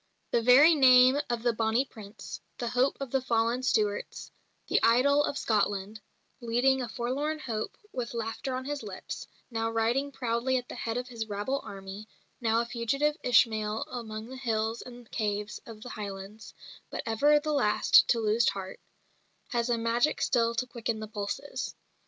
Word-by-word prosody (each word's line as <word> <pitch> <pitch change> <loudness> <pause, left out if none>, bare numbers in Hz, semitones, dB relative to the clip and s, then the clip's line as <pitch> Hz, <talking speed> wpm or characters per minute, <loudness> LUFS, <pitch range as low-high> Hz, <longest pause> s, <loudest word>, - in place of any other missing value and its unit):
The 235 - +2
very 265 +8 +7
name 260 -1 +6
of 235 -1 -2
the 240 -1 +2
"Bonnie 225 +4 +1
Prince," 215 -4 -10 0.2
the 240 - -2
hope 250 +3 +1
of 275 -3 -5
the 270 - +1
fallen 235 0 +1
Stuarts, 210 -5 -1 0.4
the - - +2
idol 275 +6 +4
of 285 - -2
Scotland 205 -1 0 0.4
leading 250 +3 +2
a 245 - -4
forlorn 270 +7 -2
hope 225 -7 -4 0.2
with 240 -2 -4
laughter 230 +3 -3
on 260 0 -4
his 290 0 -3
lips, 200 -4 -7 0.2
now 225 -1 -1
riding 235 +5 0
proudly 245 0 0
at 250 -1 -5
the - - -8
head 230 -1 -3
of 250 +1 -4
his 225 -3 -5
rabble 210 +7 -2
army, 195 +2 -8 0.3
now 230 0 +2
a - - -3
fugitive 275 +6 0
Ishmael 220 -3 +2
among 220 -3 -5
the 260 +3 -9
hills 225 -2 -1
and 245 -1 -11
caves 210 -2 -2
of 220 -2 -10
the 245 - -8
Highlands, 200 0 -8 0.3
but - - -5
ever 290 +7 +4
the 305 0 -2
last 215 -8 +5
to 235 - +2
lose 220 +1 +3
heart 190 -1 -6 0.7
has 235 0 0
a 240 - +2
magic 230 +5 +1
still 235 -2 +2
to 255 - 0
quicken 235 -2 -3
the 215 - -6
pulses. 210 +6 -4
235 Hz, 170 wpm, -29 LUFS, 220-255 Hz, 0.7 s, very